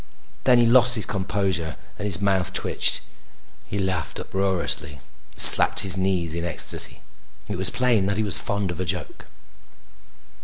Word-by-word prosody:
Then 125 -2 +2
he 120 - +1
lost 125 +1 +3
his 110 - -4
composure 95 -5 -6 0.2
and 105 - -6
his 90 -5 +3
mouth 95 -3 -3
twitched. - - -1 0.7
He 100 - -8
laughed 95 -5 -6
uproariously 95 -6 -3
and 75 - -18 0.4
slapped - - +9
his 95 -3 +6
knees 95 -4 -4
in 85 0 -7
ecstasy. 85 - 0 0.5
It - - -7
was - - +2
plain 120 -6 -2
that 100 0 -4
he 110 - -3
was 100 -4 0
fond 100 -2 -5
of 85 - -11
a 95 - -5
joke. 90 0 -8
95 Hz, 160 wpm, -20 LUFS, 90-105 Hz, 0.7 s, slapped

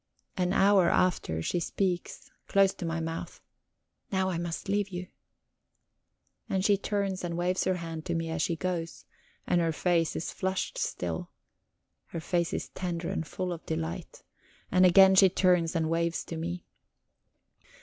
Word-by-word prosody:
An 180 -2 0
hour 195 -2 +5
after, 80 - +1
she 175 - 0
speaks, 180 0 -2 0.2
close 195 -1 +4
to 175 - -5
my 165 0 -1
mouth: 165 0 -5 0.7
"Now 190 -1 +1
I 170 - -2
must 170 -1 -4
leave 200 0 0
you." 180 -1 -6 1.4
And 190 0 0
she 205 - +5
turns 200 -1 -2
and 170 -1 -3
waves 180 +1 0
her 185 - +2
hand 165 -2 -6
to 170 - -1
me 165 0 -2
as 160 - -1
she 170 - +1
goes, 170 -1 -4 0.4
and 175 - +2
her 165 -1 +1
face 165 0 +1
is 160 - -3
flushed 190 0 -2
still; 85 -2 -3 0.8
her 165 - -5
face 170 +1 0
is - - -3
tender 175 -2 -4
and 165 -5 -3
full 180 +1 -3
of 170 - -9
delight. 80 +1 -4 0.5
And 185 0 +6
again 190 +1 +7
she 190 0 +7
turns 180 -2 +2
and 160 -1 +1
waves 165 +1 0
to 165 - -7
me. 175 +2 -4
175 Hz, 160 wpm, -29 LUFS, 165-185 Hz, 1.4 s, again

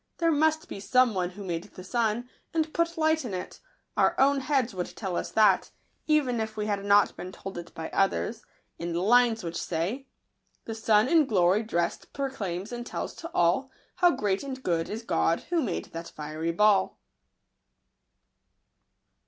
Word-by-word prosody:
There 330 -1 +2
must 315 +2 +2
be - - -7
some 250 +3 +3
one 180 -2 -1
who 200 +3 -9
made 170 -3 -3
the 185 - -12
sun, 230 +3 0 0.3
and 315 -1 0
put 335 0 0
light 315 -1 +2
in 215 -7 -4
it; 180 - -7 0.4
our - - +2
own 275 +1 +4
heads 265 -4 0
would 180 -2 -5
tell 190 -5 -3
us - - -2
that, 215 -1 +4 0.4
even 285 -6 +2
if 220 0 -4
we 210 - -1
had 200 -2 -1
not 205 0 +4
been 185 - -7
told 195 +1 -8
it 170 0 -10
by 160 0 -4
others, 210 +3 0 0.4
in 170 0 -3
the 170 - 0
lines 230 +2 +4
which 170 0 -4
say: 185 +12 -3 0.3
— - - -44
The 225 - -4
sun 220 0 +3
in 315 -1 +4
glory 190 -1 +3
dress'd 175 -6 -2
proclaims 205 -8 -4
and 240 0 -4
tells - - -5
to 330 - -7
all, 175 +10 +2 0.3
How 355 - +6
great 205 - 0
and 265 -2 -6
good 165 -2 0
is 220 +2 -5
God, 165 -6 +1
who 340 -2 +2
made 215 - -2
that 165 0 -7
fiery 155 +2 -4
ball." 200 +1 +3
215 Hz, 180 wpm, -28 LUFS, 180-265 Hz, 0.4 s, How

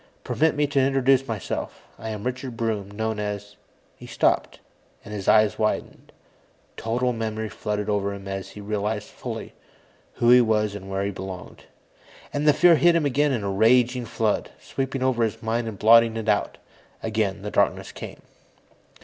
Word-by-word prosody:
Permit 160 0 +1
me 145 0 +2
to 140 -1 0
introduce 135 0 +3
myself. 110 -5 -4 0.2
I 110 - -5
am 105 -2 -5
Richard 125 -1 -4
Broom, 110 -4 -2
known 110 +1 -3
as 105 0 -5 0.2
" - - -37
He - - -10
stopped, - - 0 0.5
and 105 - -8
his 100 -2 -5
eyes 110 -1 +4
widened. 110 - -2 0.6
Total 125 +2 -1
memory 110 -1 -3
flooded 105 +1 -3
over 100 -1 0
him 100 -1 -8
as 95 0 -5
he 105 - -10
realized 105 +1 -2
fully - - -7 0.6
who 120 0 +3
he 125 0 +8
was 105 -2 +1
and 95 -1 -8
where 95 0 -1
he 100 - -1
belonged. 95 -1 -8 0.7
And 145 +1 -1
the 150 - +7
fear 170 +3 +6
hit 175 +1 +5
him 165 -3 +2
again 145 +2 +2
in 120 -6 -1
a 100 - -1
raging 120 +4 +3
flood, 110 -1 -1
sweeping 135 -1 -3
over 125 -3 +2
his 115 +1 -2
mind 115 +1 -1
and 110 -3 -6
blotting 115 +2 +5
it 110 -1 -4
out. 105 -1 +1 0.5
Again, 105 -3 -1
the 105 - -4
darkness - - +1
came. - - -9
110 Hz, 175 wpm, -24 LUFS, 105-125 Hz, 0.7 s, he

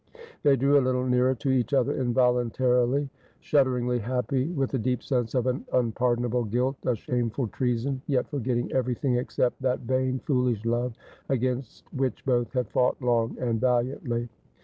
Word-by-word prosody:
They 145 -2 +5
drew 140 +2 +4
a - - +2
little 130 0 0
nearer 125 +1 +2
to 135 +2 -1
each 130 0 +1
other 135 +2 +2
involuntarily, 125 +1 +2 0.3
shudderingly 125 -4 +1
happy 130 +4 -1
— 175 - -5
with 135 -2 0
the 135 - 0
deep 125 +2 -1
sense 125 -3 -1
of 125 -2 +1
an 130 +1 -1
unpardonable 120 0 +1
guilt, 125 +5 0
a 125 - +2
shameful 120 +1 -2
treason; 125 +4 -1
yet 130 -4 +1
forgetting 125 -4 -2
everything 125 0 0
except 125 +1 -1
that 130 -1 0
vain 130 +1 0
foolish 125 -6 0
love 120 +1 0 0.3
against 130 -1 -2
which 130 -1 -2
both 120 -3 +1
had 125 -4 -2
fought 125 0 +2
long 120 -3 0
and 115 -3 -1
valiantly. 120 -1 0
125 Hz, 160 wpm, -26 LUFS, 120-130 Hz, 0.3 s, They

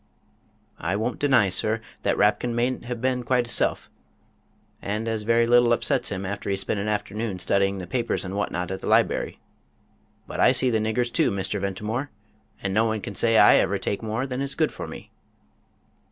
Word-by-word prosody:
"I 85 +5 -1
won't 110 +4 -2
deny, 130 -8 +4
sir, 110 +5 0 0.2
that - - 0
Rapkin 110 +3 +2
mayn't 120 +1 -1
have 120 -1 -5
been 130 -1 0
quite 125 0 +1
hisself, 120 - +1 0.9
as 110 +2 -2
a - - -9
very 115 0 +4
little 120 0 +4
upsets - - 0
him 95 -1 -4
after 100 +1 -4
he's 95 0 0
spent 100 +2 -2
an 100 - -3
afternoon 105 -1 -2
studying 100 +1 +1
the 95 - -6
papers 115 +2 -2
and 95 +1 -5
what 105 - -1
not 90 +1 -3
at 95 - -5
the - - -6
libery. - - +1 0.9
But - - -7
I 130 - +5
see 125 0 +1
the 110 - +2
niggers 115 +2 -1
too, - - +3
Mr. 100 +1 -2
Ventimore, 105 +8 -3 0.5
and 95 -1 -1
no 110 +3 +3
one 110 -1 -1
can 100 - -6
say 115 +4 +3
I - - +7
ever - - +1
take 100 - -3
more 110 +3 -2
than 130 0 -4
is 140 0 -3
good - - +1
for - - -7
me." - - -10
110 Hz, 195 wpm, -24 LUFS, 100-120 Hz, 0.9 s, I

